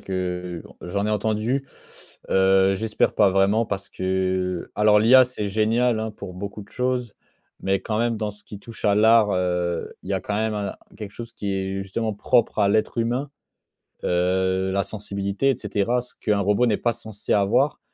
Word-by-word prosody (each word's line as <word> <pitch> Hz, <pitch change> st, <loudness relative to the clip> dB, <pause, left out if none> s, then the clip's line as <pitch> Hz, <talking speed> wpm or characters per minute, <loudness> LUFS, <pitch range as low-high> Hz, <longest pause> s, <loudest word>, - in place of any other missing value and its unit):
que 90 Hz, -2 st, -4 dB, 0.2 s
j'en 100 Hz, +4 st, -2 dB
ai -, -, 0 dB
entendu. 110 Hz, +6 st, 0 dB, 0.6 s
Heu, 95 Hz, 0 st, +4 dB
j'espère 110 Hz, +2 st, 0 dB
pas, 100 Hz, -3 st, +4 dB
vraiment, 100 Hz, +4 st, +3 dB
parce 100 Hz, -2 st, -4 dB
que 95 Hz, -1 st, -2 dB
alors 105 Hz, 0 st, +5 dB
l'IA 130 Hz, +4 st, +7 dB
c'est 115 Hz, -5 st, -4 dB
génial, 110 Hz, +3 st, +1 dB
hein, 110 Hz, 0 st, -3 dB
pour 100 Hz, -3 st, -9 dB
beaucoup 100 Hz, +2 st, -6 dB
de 100 Hz, -, -18 dB
choses. 125 Hz, -3 st, -2 dB, 0.5 s
Mais 95 Hz, 0 st, +1 dB
quand 110 Hz, -1 st, -2 dB
même 115 Hz, -1 st, +1 dB
dans 105 Hz, -1 st, -2 dB
ce 105 Hz, 0 st, -20 dB
qui 105 Hz, -, -9 dB
touche 115 Hz, +2 st, -13 dB
à 100 Hz, -1 st, +4 dB
l'art, 110 Hz, -1 st, +5 dB
heu, 90 Hz, -2 st, -1 dB
il -, -, -11 dB
y -, -, +1 dB
a 95 Hz, -, -1 dB
quand 105 Hz, -, -4 dB
même 110 Hz, 0 st, 0 dB
un 100 Hz, -1 st, -3 dB, 0.2 s
quelque 105 Hz, -2 st, -8 dB
chose 115 Hz, 0 st, -8 dB
qui 100 Hz, -3 st, -3 dB
est 95 Hz, 0 st, -2 dB
justement 110 Hz, +3 st, -3 dB
propre 115 Hz, +2 st, +1 dB
à 100 Hz, -, +4 dB
l'être 110 Hz, +3 st, +1 dB
humain. 125 Hz, +5 st, -1 dB, 0.7 s
Heu, 95 Hz, +1 st, +1 dB
la 100 Hz, 0 st, +1 dB
sensibilité, 100 Hz, +4 st, -2 dB
et 130 Hz, -, -1 dB
cetera. 105 Hz, +2 st, 0 dB
Ce 125 Hz, -, -17 dB
qu'un 105 Hz, -2 st, +1 dB
robot 105 Hz, +5 st, +2 dB
n'est 105 Hz, -, +2 dB
pas 120 Hz, -, +1 dB
censé 110 Hz, -3 st, -8 dB
avoir. 115 Hz, +8 st, +2 dB
105 Hz, 185 wpm, -23 LUFS, 95-110 Hz, 0.7 s, l'IA